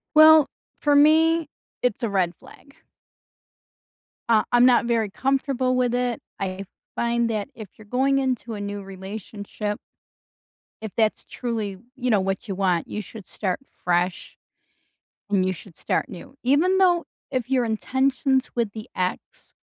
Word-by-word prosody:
Well, 310 -1 +9 0.3
for 290 -1 +2
me, 320 +2 +5 0.3
it's 250 0 0
a 230 - +1
red 185 -3 +1
flag. 280 - -17 1.5
Uh, 220 -2 +5
I'm 245 0 +6
not 245 -2 +4
very 230 -3 +1
comfortable 260 +2 0
with 250 -1 +1
it. 245 -1 -1 0.2
I 190 0 -3 0.3
find 235 0 +1
that 210 -2 -2
if 215 -3 -8
you're 215 - -14
going 270 +4 +2
into 255 -3 -2
a 205 - -5
new 205 0 -5
relationship 205 +2 -6 1.0
if 220 -2 -5
that's 220 -1 +1
truly, 220 -5 -3 0.2
you 255 -2 -2
know, 215 -4 +4
what 195 +3 -2
you 195 - -3
want, 185 -3 +1
you 210 - -4
should 210 -1 -11
start 185 -4 -2 0.2
fresh, 175 0 0 0.9
and 190 -2 +2
you 185 - +1
should 185 -1 -12
start - - -1
new. 180 - -11
Even 315 +9 +3
though, 355 -3 +4 0.3
if 255 -2 -2
your 255 -2 +3
intentions 265 +4 +1
with 230 -4 0
the 215 0 -8
ex 180 0 -4
230 Hz, 150 wpm, -24 LUFS, 200-265 Hz, 1.5 s, Well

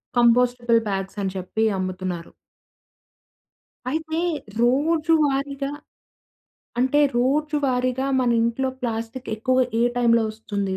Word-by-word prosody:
Compostable 240 0 +4
bags 195 +1 -3
అని 190 -1 -1
చెప్పి 190 +4 -2
అమ్ముతున్నారు. 185 -2 -4 1.6
అయితే, 315 +2 -2 0.4
రోజు 305 +6 +2
వారిగా 275 0 -2 1.1
అంటే 260 +4 +3 0.2
రోజు 295 +5 +1
వారీగా 255 +1 0
మన 245 -1 +2
ఇంట్లో 235 +3 0
ప్లాస్టిక్ 230 +1 -4
ఎక్కువగా 255 +3 +2 0.2
ఏ - - +4
టైంలో 235 -1 +4
వస్తుంది? 200 -3 -3
245 Hz, 100 wpm, -23 LUFS, 220-270 Hz, 1.6 s, Compostable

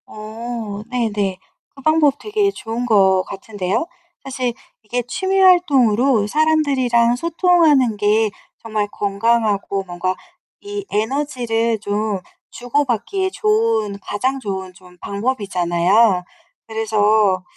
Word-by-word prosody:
어 215 -1 -6
네네. 210 -6 -1 0.4
그 275 - -13
방법 305 -1 +3
되게 420 -1 0
좋은 230 - -5
것 190 -5 +4
같은데요. 200 - -3 0.4
사실 255 -3 -3 0.3
이게 240 +4 -2
취미 380 +8 -1
활동으로 270 - +4
사람들이랑 265 -5 +2
소통하는 315 - +3
게 210 +1 +2 0.3
정말 215 -2 -2
건강하고 205 -1 0
뭔가 185 0 -3 0.4
이 410 -1 -6
에너지를 230 -1 -1
좀 205 0 -2 0.3
주고 265 +4 -1
받기에 375 - -1
좋은 425 - 0
가장 260 +8 -2
좋은 190 -5 -5
좀 180 0 -18
방법이잖아요. 200 -2 +1 0.4
그래서 215 -3 +2
225 Hz, 240 characters per minute, -19 LUFS, 205-275 Hz, 0.4 s, 것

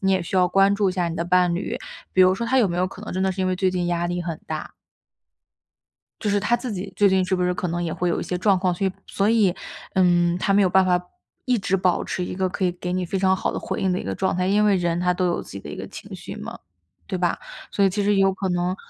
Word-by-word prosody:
你 195 -1 +2
也 190 - +2
需 180 - -3
要 180 -1 +5
关 195 +2 +4
注 200 -2 +1
一 - - -4
下 180 -2 0
你 165 - -5
的 170 - -1
伴 180 0 +3
侣， 175 - -3 0.4
比 185 - +3
如 185 0 +6
说 235 +4 -3
他 260 +3 +3
有 225 -6 +4
没 175 - -3
有 180 +1 +1
可 190 - -10
能 215 - -7
真 185 - 0
的 190 0 +1
是 190 - -5
因 185 - +1
为 185 0 0
最 190 0 +1
近 180 -1 -1
压 175 0 0
力 175 0 -2
很 170 -2 -4
大 155 -1 -5 1.5
就 215 - -1
是 205 0 +2
他 240 +5 +2
自 240 -1 -5
己 195 0 -5
最 205 - +5
近 190 -1 +3
是 185 - 0
不 180 - -1
是 180 0 +1
可 180 - -3
能 175 +1 -2
也 165 -2 -2
会 180 - -1
有 170 - 0
一 - - -3
些 180 - -3
状 190 +1 +3
况， 180 -1 +1
所 195 +3 -1
以 190 - -1
所 200 +1 0
以， 210 -6 +3 0.4
嗯， 175 -2 +3
他 195 - +1
没 200 +1 +5
有 190 - +4
办 190 +1 +4
法 180 -1 +2 0.4
一 250 -1 +2
直 195 -1 0
保 185 -1 +1
持 180 - -3
一 - - -5
个 185 0 0
可 185 +1 -3
以 180 - +2
给 180 0 -5
你 185 0 -1
非 195 - -2
常 190 0 +3
好 190 - -2
的 - - -3
回 - - -4
应 190 -1 +1
的 180 - 0
一 - - -8
个 - - -3
状 190 -1 0
态。 180 0 0
因 205 +2 +3
为 205 -2 +4
人 175 -2 0
他 180 0 +1
都 185 0 0
有 175 - 0
自 - - -13
己 100 - -7
的 75 - -9
一 - - -7
个 - - -6
情 - - -11
绪 - - -8
嘛， - - -7 0.5
对 185 - -3
吧？ 175 -1 0 0.3
所 200 - +2
以 195 - +4
其 205 +3 -1
实 205 +1 +2
也 195 - +3
有 195 0 +4
可 190 0 -3
能 180 0 0
185 Hz, 335 characters per minute, -23 LUFS, 180-195 Hz, 1.5 s, 如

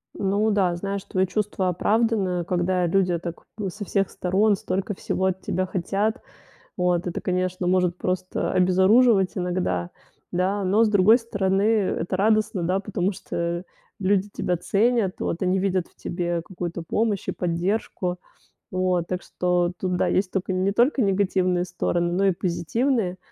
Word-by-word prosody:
Ну 200 +2 +1
да, 185 -4 +2
знаешь, 195 +2 -4
твоё 185 0 0
чувство 200 -1 -1
оправдано, 195 -2 +1
когда 180 0 +1
люди 180 -1 +2
так 170 0 -7
в 205 -3 -2
со 205 +3 -7
всех 195 0 0
сторон 200 +3 +2
столько 195 +2 -3
всего 190 0 -2
от 190 0 -1
тебя 185 0 -1
хотят. 200 +6 -1 0.6
Вот. 180 -1 +1
Это, 175 - -3
конечно, 185 0 -1
может 180 -1 +2
просто 185 0 -2
обезоруживать 190 +3 +4
иногда. 175 - -1 0.4
Да? 190 +3 0
Но, 210 +5 +4
с - - +2
другой 210 +3 +5
стороны, 200 -4 0
это 200 -5 +1
радостно, 210 -2 +2
да, 185 +3 +1
потому 195 -1 -1
что 170 0 -3 0.3
люди 200 0 +1
тебя 180 - -1
ценят, 210 +1 +1
вот, 170 - -3
они 185 +1 +2
видят 185 -2 0
в - - -32
тебе 175 -1 -2
какую-то 175 -2 -5
помощь 210 +3 -1
и - - +1
поддержку. 180 +1 -2 0.5
Вот. 185 -2 0
Так 185 0 -3
что 180 -1 0
тут, 185 -1 -1
да, - - +1
есть 185 -1 +1
только 190 -1 -2
не 185 +2 +1
только 245 +6 +3
негативные 185 -3 +1
стороны, 175 -1 -1
но 195 +2 +2
и 195 - +5
позитивные. 185 - -1
185 Hz, 155 wpm, -24 LUFS, 180-200 Hz, 0.6 s, другой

